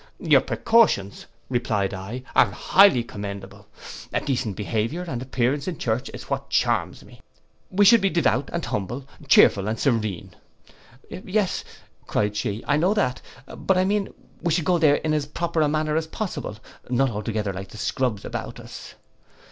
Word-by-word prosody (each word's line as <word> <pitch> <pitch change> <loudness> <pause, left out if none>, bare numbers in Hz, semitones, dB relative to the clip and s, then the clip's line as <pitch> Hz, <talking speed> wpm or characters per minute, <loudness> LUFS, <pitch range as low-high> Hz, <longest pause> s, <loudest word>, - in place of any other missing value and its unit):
'Your - - +4
precautions,' 225 - +2 0.2
replied 110 -6 -1
I, 100 +7 -6
'are - - +6
highly 190 -11 +4
commendable. 100 -3 -8 0.4
A - - +1
decent 120 -7 -2
behaviour 115 - -2
and 130 -9 -5
appearance 130 +3 -1
in 175 -4 -3
church 120 +3 -2
is - - -8
what - - -4
charms - - 0
me. - - -17 0.5
We 205 +2 +3
should 230 +2 +7
be 195 - +2
devout 140 - +1
and 170 -4 -3
humble, 120 +7 -4 0.2
chearful 100 -6 +5
and 110 +1 -1
serene.'—'Yes,' 120 - -3 0.4
cried 105 0 0
she, 105 +1 -3
'I 145 - +3
know 180 +6 +3
that; 130 -12 0 0.3
but 190 - +1
I 185 - +3
mean 205 0 0 0.3
we 170 - 0
should 165 0 +1
go 180 -2 +2
there 150 -3 +5
in 155 +1 -1
as 150 -2 -1
proper 165 +1 -1
a 150 - +4
manner 155 0 0
as 160 0 0
possible; 175 - -5 0.3
not 130 +1 +2
altogether 105 -1 -3
like 95 +1 -7
the - - -11
scrubs 115 -1 -1
about - - -6
us. - - -10
130 Hz, 165 wpm, -24 LUFS, 105-170 Hz, 0.5 s, should